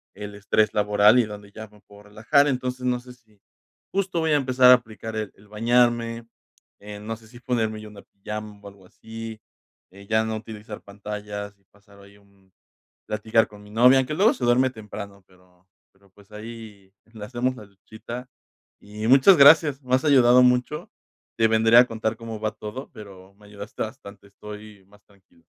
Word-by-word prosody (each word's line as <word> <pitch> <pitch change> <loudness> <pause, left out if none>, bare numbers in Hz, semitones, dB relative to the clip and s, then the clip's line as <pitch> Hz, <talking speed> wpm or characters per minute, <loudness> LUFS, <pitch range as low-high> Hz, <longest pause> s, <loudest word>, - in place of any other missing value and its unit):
el 105 0 -8
estrés 105 +1 0
laboral 105 +2 +4
y 120 - +4
dónde 105 -1 -11
ya 110 +1 -10
me 105 0 -22
puedo 100 0 -18
relajar, 115 +8 +1
entonces 125 -1 -3
no 125 -1 0
sé 125 0 -14
si, 110 -5 -29 0.5
justo 190 -3 -1
voy 160 -1 0
a 150 - +4
empezar 130 -2 +4
a - - +10
aplicar 110 -2 -8
el 110 -3 -4
el 105 +1 -21
bañarme, 115 +1 0 0.5
eh, 105 0 -10
no 110 +2 -6
sé 110 0 -19
si 120 +2 -15
ponerme 110 -4 -2
yo 110 - -11
una 100 -1 -14
pijama 105 +1 -9
o - - -10
algo 100 -2 -15
así, 110 +2 -10 0.5
eh, 100 +1 -15
ya 110 +1 +2
no 110 0 -3
utilizar 110 -1 -10
pantallas 105 0 -8
y - - -37
pasar 100 +1 -23
ahí, 100 +1 -18
un 100 -2 -28 0.5
platicar 110 +1 +1
con 105 -1 -15
mi 105 - -16
novia, 125 +5 +5
aunque 130 +3 -1
luego 205 +8 +4
se 125 - -5
duerme 125 +2 +3
temprano, 105 -3 -10
pero 90 0 -27 0.2
pero, 100 0 -28
pues, 100 +2 -22
ahí 105 -3 -11 0.2
le 105 -2 -8
hacemos 125 +3 -2
la 110 - -11
luchita, 110 +5 -10 0.5
y 105 +1 -7
muchas 135 +8 +6
gracias, 145 -1 +6
me 130 -1 -1
has 130 - +1
ayudado 125 -4 +5
mucho, 125 +4 0 0.5
te 110 -1 +4
vendré 110 +1 +5
a 125 - +7
contar 110 -1 -3
cómo 115 -1 -8
va 110 0 -1
todo, 110 +6 -9
pero 95 -2 -13
me 105 0 -20
ayudaste 100 +1 -8
bastante, 105 -4 -10
estoy 105 0 -12
más 105 +1 -23
tranquilo. 95 -4 -28
110 Hz, 190 wpm, -23 LUFS, 105-120 Hz, 0.5 s, a